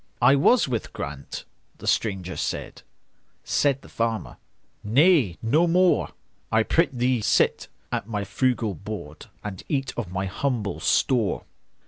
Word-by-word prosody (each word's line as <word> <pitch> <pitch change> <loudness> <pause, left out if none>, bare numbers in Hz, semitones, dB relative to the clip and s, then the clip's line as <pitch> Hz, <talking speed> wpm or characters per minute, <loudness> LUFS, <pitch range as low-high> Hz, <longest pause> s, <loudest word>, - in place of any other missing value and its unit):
"I 125 +2 +6
was 215 - +4
with 120 -4 -3
Grant"—the 70 -1 -8
stranger 95 -5 0
said; - - -4 0.6
Said 140 -2 +1
the - - -13
farmer, 115 -1 -2 0.5
"Nay, 130 - +4
no 155 +10 +3
more,—I 170 -9 +1
prithee 125 -5 +1
sit - - +2 0.2
at - - -2
my 105 -2 -2
frugal 120 0 0
board, 85 -5 -8 0.2
And 100 -3 -6
eat 135 -4 -1
of 110 -7 -4
my 95 +1 -2
humble 105 -1 -2
store. 115 -8 +1
115 Hz, 120 wpm, -25 LUFS, 100-135 Hz, 0.6 s, I